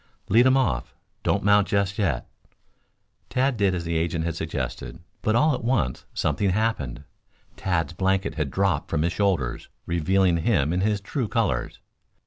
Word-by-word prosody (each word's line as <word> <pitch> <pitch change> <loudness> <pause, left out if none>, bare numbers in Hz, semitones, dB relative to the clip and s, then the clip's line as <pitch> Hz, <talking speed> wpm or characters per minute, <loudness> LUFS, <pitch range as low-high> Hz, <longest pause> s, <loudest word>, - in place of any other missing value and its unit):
"Lead 120 +3 +6
him 130 +1 +5
off. 70 - -1 0.3
Don't - - 0
mount 100 0 +4
just 100 0 0
yet." 85 - 0 1.0
Tad 130 +1 +1
did 100 -4 +2
as 85 - -3
the 85 0 -1
agent 80 0 -1
had 85 -2 -2
suggested. 80 -1 -4 0.2
But 110 - +1
all 150 +5 +4
at 125 - -4
once 110 - 0
something 95 +7 0
happened. 95 - -1 0.5
Tad's 85 -5 -1
blanket 95 +2 0
had 75 -4 -2
dropped 95 -3 0
from 80 -2 0
his 85 +1 0
shoulders, 90 -13 -1 0.2
revealing 90 +1 +2
him 80 -4 +1
in 90 - 0
his 105 0 +1
true 120 +4 -2
colors. 95 - -1
95 Hz, 160 wpm, -25 LUFS, 80-105 Hz, 1.0 s, Lead